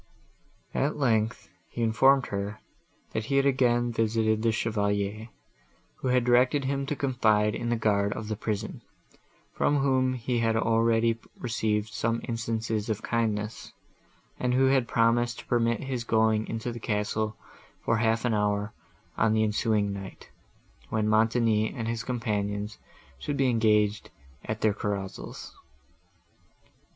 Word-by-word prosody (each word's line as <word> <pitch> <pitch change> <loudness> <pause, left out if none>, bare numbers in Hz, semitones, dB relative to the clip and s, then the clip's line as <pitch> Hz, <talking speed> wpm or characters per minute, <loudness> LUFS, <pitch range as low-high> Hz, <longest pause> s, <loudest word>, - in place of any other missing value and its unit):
At 140 +3 0
length, 115 - +1 0.2
he 120 - -3
informed 130 +4 +4
her, 100 +1 -3 0.5
that 110 - -2
he 140 - -1
had 140 - +3
again 120 -3 +2
visited 110 -1 +1
the 115 0 +2
Chevalier, 105 -1 -1 0.7
who - - -3
had 125 -1 +3
directed 125 +3 +3
him 135 0 -1
to 150 - -1
confide 110 -6 +2
in 120 +1 -3
the 120 - +2
guard 100 -3 +1
of 115 - -6
the 110 - -2
prison, 110 0 -4 0.7
from 145 - +2
whom 130 -2 +2
he 120 0 -1
had 115 -1 +1
already 115 0 +2 0.2
received 110 -3 -1
some 115 0 0
instances 115 -2 -2
of 110 0 -2
kindness, 110 -2 -2 0.7
and 125 0 +1
who 135 +1 +4
had 130 -3 +2
promised 115 +1 +2
to - - -10
permit 115 -1 +1
his 130 -3 -3
going 110 -1 +2
into 115 +2 -3
the 120 - -7
castle 105 0 -1 0.5
for 115 - +2
half 115 +1 +1
an 120 - +1
hour, 105 0 0 0.5
on 110 - +3
the 110 0 +3
ensuing 105 -1 +1
night, 95 -1 -9 0.6
when 110 -1 0
Montoni 110 0 +2
and 115 -2 -4
his 115 0 -2
companions 105 -4 -2 0.4
should 145 - -3
be 135 -2 +3
engaged 105 -2 +2 0.3
at 110 0 -4
their 110 -2 +3
carousals. 100 -2 -5
115 Hz, 140 wpm, -27 LUFS, 105-120 Hz, 0.7 s, informed